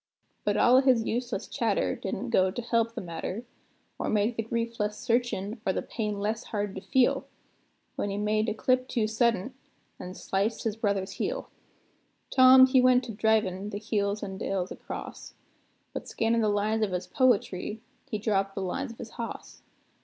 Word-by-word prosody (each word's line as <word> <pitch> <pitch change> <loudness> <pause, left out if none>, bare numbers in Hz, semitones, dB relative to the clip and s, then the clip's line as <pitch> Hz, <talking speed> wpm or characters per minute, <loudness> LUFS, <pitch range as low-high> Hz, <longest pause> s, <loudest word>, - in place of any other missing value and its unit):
But - - +1
all 250 +1 +6
o' - - +7
his 255 -4 +4
useless 245 +1 -2
chatter - - 0
didn't - - -4
go 185 0 +4
to 225 +6 -4
help 230 -1 +1
the - - -3
matter, 185 +6 -5 0.5
Or - - -1
make 215 +2 +1
the 225 - 0
grief 230 +1 -3
less 210 0 -1
searchin' 230 -2 -1
or 190 - +1
the - - -2
pain 210 -3 -3
less 215 +2 -2
hard 205 -2 -3
to 190 - -6
feel, 260 +3 +2 0.7
When 205 - -1
he 200 - -3
made 215 +1 +1
a 215 - -2
clip 255 +2 +1
too 230 -5 0
suddent, 230 +1 +1 0.5
an' 180 +1 -7
sliced 200 +4 -1
his 220 -2 -1
brother's 200 -3 -1
heel. - - -3 0.8
Tom 260 0 +8
he 260 0 +4
went 250 -1 +4
a - - -2
drivin' 210 -3 +1
the 205 - -4
hills 205 -1 -1
an' 190 -1 -5
dales 190 -2 -2
across; - - -8 0.6
But, - - -5
scannin' 230 +1 +1
the 215 - +2
lines 210 +2 +1
of 205 -4 0
his 180 0 -2
poetry, 210 -2 +1 0.3
he 220 - -1
dropped 195 -2 0
the 195 - -2
lines 235 +8 -3
of 230 - -12
his 225 - -8
hoss. 230 -1 -7
220 Hz, 185 wpm, -28 LUFS, 200-235 Hz, 0.8 s, Tom